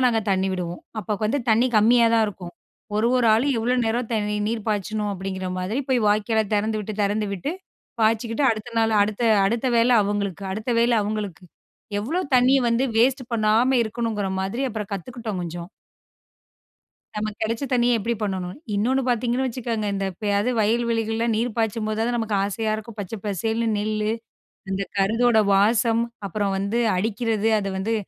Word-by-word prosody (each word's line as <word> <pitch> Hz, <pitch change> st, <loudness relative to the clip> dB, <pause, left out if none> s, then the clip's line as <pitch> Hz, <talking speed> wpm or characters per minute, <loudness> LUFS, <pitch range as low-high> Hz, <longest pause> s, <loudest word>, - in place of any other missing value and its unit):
நாங்க 225 Hz, -2 st, +2 dB
தண்ணி 190 Hz, 0 st, +1 dB
விடுவோம். 175 Hz, -1 st, -4 dB, 0.2 s
அப்போ 210 Hz, +1 st, -3 dB
க் -, -, 0 dB
வந்து 275 Hz, +6 st, 0 dB
தண்ணி 230 Hz, +3 st, +4 dB
கம்மியா 230 Hz, +2 st, +5 dB
தான் 225 Hz, -1 st, +4 dB
இருக்கும். 180 Hz, -4 st, -7 dB, 0.4 s
"ஒரு, 220 Hz, +2 st, +2 dB
ஒரு 245 Hz, -, +2 dB
ஆளும் 265 Hz, +4 st, +2 dB
எவ்வளோ 245 Hz, +3 st, +1 dB
நேரம் 230 Hz, +1 st, -1 dB
தண் 210 Hz, -1 st, 0 dB, 0.2 s
நீர் 225 Hz, -1 st, -3 dB
பாய்ச்சணும்." 210 Hz, 0 st, -1 dB
அப்படீங்கிற 190 Hz, 0 st, -4 dB
மாதிரி 205 Hz, +9 st, -2 dB
போய் 250 Hz, -, +3 dB
வாய்க்கால 220 Hz, +1 st, +2 dB
தெறந்துவிட்டு, 215 Hz, 0 st, -1 dB
தெறந்துவிட்டு, 205 Hz, -, -1 dB, 0.5 s
பாய்ச்சிக்கிட்டு 230 Hz, +4 st, +1 dB
அடுத்த 220 Hz, +2 st, -4 dB
நாள், 225 Hz, -1 st, +2 dB
அடுத்த 210 Hz, +3 st, -2 dB, 0.2 s
அடுத்த 235 Hz, +5 st, 0 dB
வேளை 240 Hz, +2 st, +4 dB
அவங்களுக்கு, 200 Hz, -2 st, -2 dB
அடுத்த 220 Hz, +4 st, -4 dB
வேளை 235 Hz, 0 st, +3 dB
அவங்களுக்கு. 205 Hz, -4 st, -4 dB, 0.6 s
எவ்வளோ 315 Hz, -, -1 dB, 0.2 s
தண்ணிய 260 Hz, +2 st, +4 dB
வந்து 235 Hz, +3 st, +2 dB
வேஸ்ட் 255 Hz, +3 st, +3 dB
பண்ணாம 230 Hz, +4 st, +3 dB
இருக்கணுங்கிற 220 Hz, -3 st, -2 dB
மாதிரி 195 Hz, +8 st, -2 dB
அப்பறம் 215 Hz, -3 st, -5 dB
கத்துக்கிட்டோம் 225 Hz, 0 st, -5 dB
கொஞ்சம். 170 Hz, +1 st, -6 dB, 1.5 s
நமக்கு 210 Hz, 0 st, -3 dB
கெடைச்ச 230 Hz, +4 st, -2 dB
தண்ணிய 240 Hz, -1 st, +3 dB
எப்படி 235 Hz, +4 st, -1 dB
பண்ணணும்? 185 Hz, -3 st, -3 dB, 0.2 s
இன்னொன்னு 250 Hz, +6 st, +1 dB
பார்த்தீங்கன்னு 245 Hz, +2 st, +1 dB
வச்சுக்கங்க, 230 Hz, -3 st, -3 dB
இந்த 195 Hz, 0 st, -2 dB
எப்பயாவது 205 Hz, +4 st, 0 dB
வயல் 230 Hz, +3 st, +2 dB
வெளிகள்ல 225 Hz, 0 st, 0 dB
நீர் 230 Hz, +1 st, -1 dB
பாய்ச்சும்போதாவது 225 Hz, +1 st, -1 dB
நமக்கு 220 Hz, -2 st, -1 dB
ஆசையா 215 Hz, +2 st, -1 dB
இருக்கும். 220 Hz, 0 st, -9 dB
பச்சை 205 Hz, +3 st, -5 dB
பசேல்ன்னு 225 Hz, +4 st, -1 dB
நெல்லு, 215 Hz, +1 st, -1 dB, 0.6 s
அந்த 195 Hz, +1 st, -1 dB
கருதோட 225 Hz, +4 st, +3 dB, 0.2 s
வாசம், 225 Hz, +3 st, +3 dB, 0.3 s
அப்பறம் 200 Hz, 0 st, -1 dB
வந்து 200 Hz, +5 st, -1 dB, 0.2 s
அடிக்கிறது, 220 Hz, +2 st, 0 dB
அத 200 Hz, -, -4 dB
வந்து 215 Hz, +4 st, -1 dB
220 Hz, 155 wpm, -23 LUFS, 205-235 Hz, 1.5 s, கம்மியா